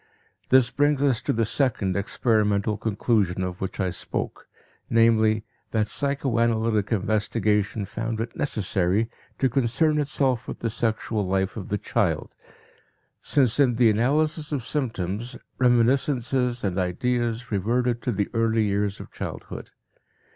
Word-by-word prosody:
This 130 -2 +5
brings 145 -1 +2
us 130 -5 +2
to - - -1
the 115 0 +1
second 110 -6 0
experimental 105 0 +1
conclusion 105 -3 0
of 90 -1 -5
which 95 - -4
I 95 -2 0
spoke, 85 - -5 0.4
namely, 110 -1 +3 0.2
that 110 -1 0
psychoanalytic 115 -6 0
investigation 105 -1 0
found 115 +2 -4
it 115 +1 -4
necessary 105 -3 0 0.3
to 135 - +2
concern 135 +5 +1
itself 135 -4 0
with - - -5
the 115 - -1
sexual 110 -2 -1
life 95 +1 0
of 100 -5 -7
the 105 - 0
child, - - -1 0.8
since, 130 -3 +2
in 130 -4 +4
the 115 -2 +5
analysis 150 +7 +1
of 135 -6 -2
symptoms, 120 - -3 0.2
reminiscences 125 0 +2
and 95 -2 -1
ideas 115 +5 -1
reverted 120 +4 0
to 125 - -1
the 100 -2 -1
early 115 -1 +2
years 100 -1 -1
of - - -10
childhood. - - -7
115 Hz, 135 wpm, -25 LUFS, 105-125 Hz, 0.8 s, This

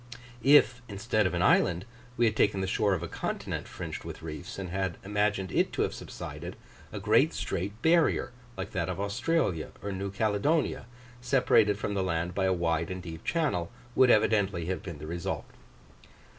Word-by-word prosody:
If, 130 -1 +5
instead 110 0 +1
of 90 - -3
an 85 - +1
island, 90 0 +3 0.3
we 120 - +4
had 110 -1 +2
taken 100 -2 +2
the - - 0
shore 100 +1 +2
of 90 - -4
a - - -3
continent - - -4
fringed - - -6
with - - -8
reefs, 80 +4 -7
and 95 -2 -5
had 95 -2 -2
imagined 100 -2 0
it - - +2
to - - +1
have - - -1
subsided, - - -7 0.4
a - - -5
great - - +3
straight 100 +5 -3
barrier, 165 -6 +3 0.3
like 95 0 -5
that 90 -1 -2
of 90 - -3
Australia 100 - 0
or 100 - -3
New 100 +1 -3
Caledonia, 110 +9 0 0.3
separated 120 -6 +3
from 100 0 -3
the 100 - 0
land 90 -1 -1
by 95 - 0
a 95 - +3
wide 85 -2 0
and 95 -1 -5
deep 80 -2 -8
channel, 150 - 0 0.2
would 130 0 +5
evidently 105 -6 +3
have 90 +2 -2
been 85 -5 -7
the 75 - -8
result. 85 +2 -3
95 Hz, 185 wpm, -29 LUFS, 90-110 Hz, 0.4 s, If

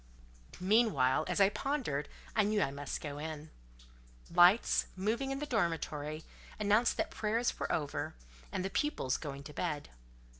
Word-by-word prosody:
Meanwhile, 185 - +3
as - - -1
I 195 -1 +6
pondered, 215 - -2 0.3
I 215 - +5
knew 210 +1 +2
I 135 - +1
must 140 0 -5
go 145 -1 -5
in. 155 0 -6 0.8
Lights, 175 +6 +5
moving 220 +8 -1
in 270 - -2
the 295 - -3
dormitory, 160 - -1 0.4
announced 210 +3 +3
that - - -1
prayers 225 +3 0
were - - -2
over, 145 - -2 0.4
and 185 - -2
the 195 - -3
pupils 190 - 0
going 140 -2 -6
to 150 - -10
bed. 150 -2 -3
180 Hz, 150 wpm, -33 LUFS, 150-220 Hz, 0.8 s, I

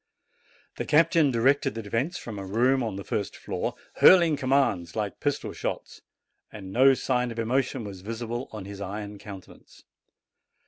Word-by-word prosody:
The - - -3
captain 155 -1 +4
directed 135 +3 +2
the 115 - -5
defence 125 - -2
from 110 -4 -7
a - - -5
room 120 +7 +2
on 110 -5 -3
the 100 - -6
first 100 0 -3
floor, - - -3 0.2
hurling 170 -4 +7
commands 130 - +1
like 105 -2 -3
pistol 145 -1 -2
shots, - - -5 0.5
and 95 -3 -9
no 135 +3 +6
sign 125 -1 0
of 115 - -8
emotion 125 +2 0
was 100 -3 -8
visible 115 +4 -5
on 105 -3 -7
his 100 0 -8
iron 100 +1 -6
countenance. 100 -3 -12
115 Hz, 155 wpm, -26 LUFS, 100-135 Hz, 0.5 s, hurling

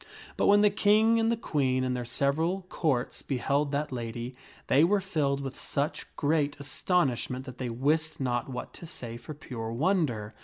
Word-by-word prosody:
But - - +2
when 205 0 +6
the 210 -1 +5
King 220 +2 +4
and 225 0 +2
the 235 - +1
Queen 130 - 0
and 130 0 0
their 125 -1 -3
several 160 +9 0
Courts 135 -7 -1
beheld 140 +2 0
that 150 +1 -1
lady, 120 0 -5 0.3
they 140 +4 +4
were 200 +4 +4
filled 150 -8 0
with 135 -1 -6
such 145 +2 -2
great 145 -1 +1
astonishment 135 -4 0
that 130 -2 -9
they 125 -2 -2
wist 150 +7 0
not 125 -1 -1
what 125 -1 -6
to 170 - -10
say 120 -8 -6
for 120 +6 -8
pure 115 -6 -6
wonder. 125 - 0
140 Hz, 180 wpm, -29 LUFS, 125-165 Hz, 0.3 s, when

